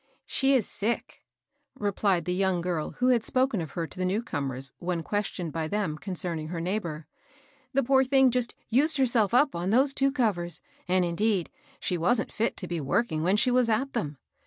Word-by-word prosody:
" -, -, -40 dB
She 270 Hz, 0 st, +2 dB
is 240 Hz, -6 st, +1 dB
sick," 225 Hz, +3 st, -3 dB, 0.6 s
replied 200 Hz, -5 st, 0 dB
the 180 Hz, -, 0 dB
young 190 Hz, -1 st, +1 dB
girl 170 Hz, -3 st, -2 dB
who 250 Hz, +1 st, +1 dB
had 240 Hz, -3 st, +3 dB
spoken 255 Hz, -7 st, +1 dB
of 155 Hz, -4 st, -7 dB
her 170 Hz, -, -2 dB
to 170 Hz, -, -11 dB
the -, -, 0 dB
new 195 Hz, +5 st, 0 dB
comers, 135 Hz, -, -3 dB
when 175 Hz, -2 st, -2 dB
questioned 185 Hz, -6 st, -3 dB
by 160 Hz, -1 st, -2 dB
them 200 Hz, -5 st, -1 dB
concerning 170 Hz, -2 st, -4 dB
her 170 Hz, +1 st, -4 dB
neighbor. 170 Hz, -4 st, -3 dB, 0.3 s
" 270 Hz, -1 st, -33 dB
The 275 Hz, -, +3 dB
poor 265 Hz, +1 st, +4 dB
thing 265 Hz, -1 st, +4 dB
just 245 Hz, -1 st, -1 dB
used 295 Hz, +6 st, +2 dB
herself 235 Hz, -6 st, +3 dB
up 275 Hz, +3 st, +4 dB
on 175 Hz, +2 st, -2 dB
those 265 Hz, +6 st, +4 dB
two 275 Hz, 0 st, +2 dB
covers; 205 Hz, -11 st, 0 dB, 0.3 s
and, 185 Hz, 0 st, +3 dB
indeed, 185 Hz, +1 st, 0 dB, 0.3 s
she 180 Hz, -, -2 dB
wasn't 220 Hz, +7 st, +1 dB
fit 230 Hz, +2 st, 0 dB
to 185 Hz, -, -3 dB
be 170 Hz, -2 st, -3 dB
working 155 Hz, -, 0 dB
when 185 Hz, +5 st, +2 dB
she 250 Hz, +4 st, +3 dB
was 250 Hz, -1 st, +3 dB
at 265 Hz, +5 st, 0 dB
them. 150 Hz, -, -3 dB
205 Hz, 205 wpm, -27 LUFS, 170-250 Hz, 0.6 s, poor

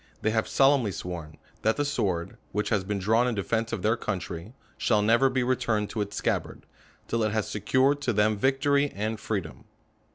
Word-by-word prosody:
They 110 Hz, -, +2 dB
have 110 Hz, 0 st, 0 dB
solemnly 135 Hz, -6 st, +3 dB
sworn, 85 Hz, -3 st, -6 dB, 0.2 s
that 110 Hz, +1 st, +2 dB
the 145 Hz, -, +1 dB
sword, 95 Hz, -11 st, -1 dB, 0.2 s
which 105 Hz, +2 st, -1 dB
has 105 Hz, -4 st, +1 dB
been 105 Hz, +1 st, -2 dB
drawn 110 Hz, +5 st, +2 dB
in 120 Hz, -, -1 dB
defence 115 Hz, +3 st, -1 dB
of -, -, -3 dB
their 110 Hz, +2 st, +3 dB
country, 95 Hz, -1 st, -5 dB, 0.2 s
shall 105 Hz, -3 st, +2 dB
never 115 Hz, +5 st, +4 dB
be 130 Hz, -1 st, 0 dB
returned 120 Hz, -4 st, 0 dB
to 110 Hz, -, -2 dB
its 100 Hz, 0 st, -4 dB
scabbard, -, -, -2 dB, 0.4 s
till 115 Hz, -, 0 dB
it 110 Hz, -1 st, +1 dB
has 110 Hz, -2 st, 0 dB
secured 130 Hz, +7 st, +1 dB
to 130 Hz, -, +1 dB
them 105 Hz, 0 st, +2 dB
vic 135 Hz, +5 st, +1 dB
tory 145 Hz, 0 st, +3 dB
and 110 Hz, +2 st, -2 dB
freedom. 85 Hz, -, -4 dB
110 Hz, 195 wpm, -27 LUFS, 100-125 Hz, 0.4 s, never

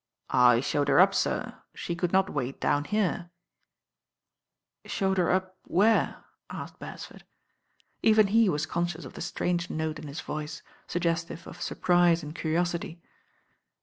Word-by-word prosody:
"I 125 Hz, -2 st, +6 dB
showed 145 Hz, +1 st, 0 dB
her 140 Hz, -, +4 dB
up, -, -, +6 dB
sir. -, -, -1 dB
She 170 Hz, -, -4 dB
couJd 175 Hz, +1 st, -2 dB
aot 190 Hz, 0 st, +5 dB
;^ 145 Hz, -7 st, -2 dB
ait 135 Hz, -, -10 dB
down 145 Hz, 0 st, +1 dB
here 185 Hz, -3 st, -1 dB, 0.8 s
" -, -, -59 dB
"Showed 190 Hz, -1 st, +1 dB
her 175 Hz, -, +2 dB
up 185 Hz, 0 st, -1 dB
where?" 215 Hz, +5 st, +2 dB, 0.2 s
asked -, -, -8 dB
Beresford. -, -, -9 dB, 0.8 s
Even 215 Hz, -1 st, +5 dB
he 220 Hz, +1 st, +4 dB
was 150 Hz, -3 st, 0 dB
conscious 170 Hz, 0 st, -3 dB
of -, -, -10 dB
the -, -, -8 dB
strange 175 Hz, 0 st, -1 dB
note 155 Hz, 0 st, -3 dB
in 155 Hz, -, -8 dB
his 145 Hz, +2 st, -6 dB
voice, 150 Hz, +1 st, -6 dB, 0.2 s
sug 175 Hz, -, -3 dB
gestive 170 Hz, 0 st, -2 dB
of -, -, -11 dB
surprise 175 Hz, -2 st, +2 dB
and 150 Hz, 0 st, -7 dB
curiosity. 170 Hz, +1 st, -2 dB
170 Hz, 155 wpm, -28 LUFS, 155-185 Hz, 0.8 s, I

